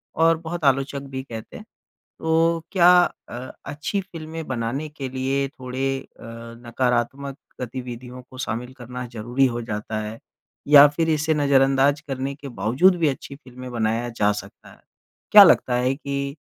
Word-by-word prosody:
और 165 Hz, 0 st, +4 dB
बहुत 170 Hz, +1 st, -6 dB
आलोचक 135 Hz, +1 st, +1 dB
भी 130 Hz, 0 st, -5 dB
कहते 115 Hz, -4 st, -9 dB
हैं -, -, -12 dB, 0.5 s
तो 165 Hz, 0 st, +2 dB
क्या 180 Hz, -2 st, +6 dB, 0.4 s
अ, -, -, -7 dB, 0.3 s
अच्छी 150 Hz, +8 st, -3 dB
फ़िल्में 165 Hz, -3 st, -8 dB
बनाने 130 Hz, +4 st, -3 dB
के 140 Hz, -3 st, -6 dB
लिए 135 Hz, +1 st, -1 dB
थोड़े 135 Hz, +1 st, -3 dB, 0.2 s
अ, -, -, -13 dB, 0.4 s
नकारात्मक 130 Hz, +3 st, -1 dB, 0.2 s
गतिविधियों 125 Hz, 0 st, -7 dB
को 130 Hz, -, -13 dB
शामिल 125 Hz, +1 st, -4 dB
करना 125 Hz, 0 st, -7 dB
ज़रूरी 120 Hz, +4 st, +1 dB
हो 120 Hz, -2 st, -1 dB
जाता 110 Hz, 0 st, -4 dB
है 110 Hz, +2 st, -7 dB, 0.5 s
या 145 Hz, 0 st, +9 dB
फिर 160 Hz, +3 st, -1 dB
इसे 155 Hz, +1 st, +1 dB
नजरअंदाज 140 Hz, 0 st, +3 dB
करने 135 Hz, -1 st, -4 dB
के 145 Hz, -1 st, -10 dB
बावज़ूद 125 Hz, -, +3 dB
भी 160 Hz, -, +3 dB
अच्छी 140 Hz, 0 st, -4 dB
फ़िल्मे 130 Hz, -2 st, -11 dB
बनाया 115 Hz, 0 st, -1 dB
जा 105 Hz, -3 st, +1 dB
सकता 105 Hz, -, -9 dB
है। -, -, -19 dB, 0.5 s
क्या 205 Hz, -1 st, +11 dB
लगता 155 Hz, -8 st, +4 dB
है 125 Hz, +2 st, +1 dB
कि 140 Hz, 0 st, -4 dB
135 Hz, 155 wpm, -23 LUFS, 125-150 Hz, 0.5 s, क्या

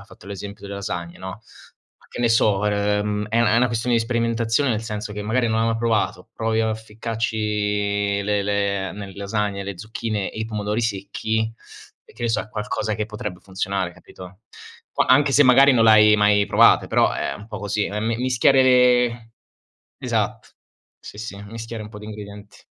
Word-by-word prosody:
hai -, -, -13 dB
fatto -, -, -16 dB
l'esempio 100 Hz, 0 st, -8 dB
delle 100 Hz, 0 st, -7 dB
lasagne, 90 Hz, -3 st, -5 dB
no, 95 Hz, +4 st, -8 dB, 0.7 s
che -, -, -9 dB
ne 120 Hz, -, +3 dB
so 105 Hz, -3 st, +3 dB
ehm 105 Hz, 0 st, 0 dB
è 115 Hz, +2 st, +1 dB
una 110 Hz, -3 st, +3 dB
è -, -, +4 dB
una 125 Hz, +1 st, +3 dB
questione 120 Hz, +1 st, 0 dB
di 115 Hz, -, +3 dB
sperimentazione 115 Hz, +2 st, 0 dB
nel 110 Hz, -1 st, -1 dB
senso 105 Hz, -2 st, -5 dB
che 105 Hz, 0 st, -5 dB
magari 120 Hz, +3 st, 0 dB
non 110 Hz, 0 st, +1 dB
hai 115 Hz, -, +2 dB
mai 115 Hz, 0 st, 0 dB
provato, 115 Hz, 0 st, -1 dB
provi 110 Hz, 0 st, -1 dB
a 110 Hz, -1 st, 0 dB
ficcarci 105 Hz, -2 st, -2 dB
le 105 Hz, -1 st, +1 dB
le 100 Hz, -1 st, -1 dB
nelle 100 Hz, -1 st, -8 dB
lasagne, 100 Hz, 0 st, -2 dB
le 95 Hz, -2 st, -7 dB
zucchine 110 Hz, 0 st, -3 dB
e -, -, -9 dB
i -, -, -1 dB
pomodori 105 Hz, 0 st, -2 dB
secchi, 110 Hz, +1 st, -2 dB, 0.5 s
e -, -, -19 dB
che -, -, -10 dB
ne -, -, +1 dB
so, 115 Hz, -, +1 dB
è -, -, -9 dB
qualcosa 105 Hz, 0 st, -3 dB
che 105 Hz, -, -2 dB
potrebbe 105 Hz, -4 st, -6 dB
funzionare, 95 Hz, -1 st, -3 dB
capito? 95 Hz, +1 st, -14 dB, 0.5 s
Qua -, -, 0 dB
anche 140 Hz, +2 st, +5 dB
se 145 Hz, +1 st, +5 dB
magari 135 Hz, +2 st, +7 dB
non 115 Hz, -2 st, +4 dB
l'hai 105 Hz, -1 st, +7 dB
mai 105 Hz, 0 st, +4 dB
provate, -, -, +5 dB
però -, -, +3 dB
è -, -, -2 dB
un 105 Hz, -, -11 dB
po' 105 Hz, -3 st, -7 dB
così, 105 Hz, +1 st, -1 dB
ehm, 105 Hz, +1 st, -3 dB
mi 115 Hz, 0 st, 0 dB
mischiare 130 Hz, +2 st, +3 dB
le 125 Hz, -2 st, +3 dB, 0.7 s
esatto. -, -, -2 dB, 0.5 s
Sì, 105 Hz, -, -12 dB
sì, 110 Hz, -2 st, -6 dB
mischiare 115 Hz, +1 st, -7 dB
un 105 Hz, -, -9 dB
po' 105 Hz, -, -10 dB
di 105 Hz, -, -10 dB
ingredienti. 105 Hz, -1 st, -10 dB
105 Hz, 195 wpm, -22 LUFS, 100-115 Hz, 0.7 s, magari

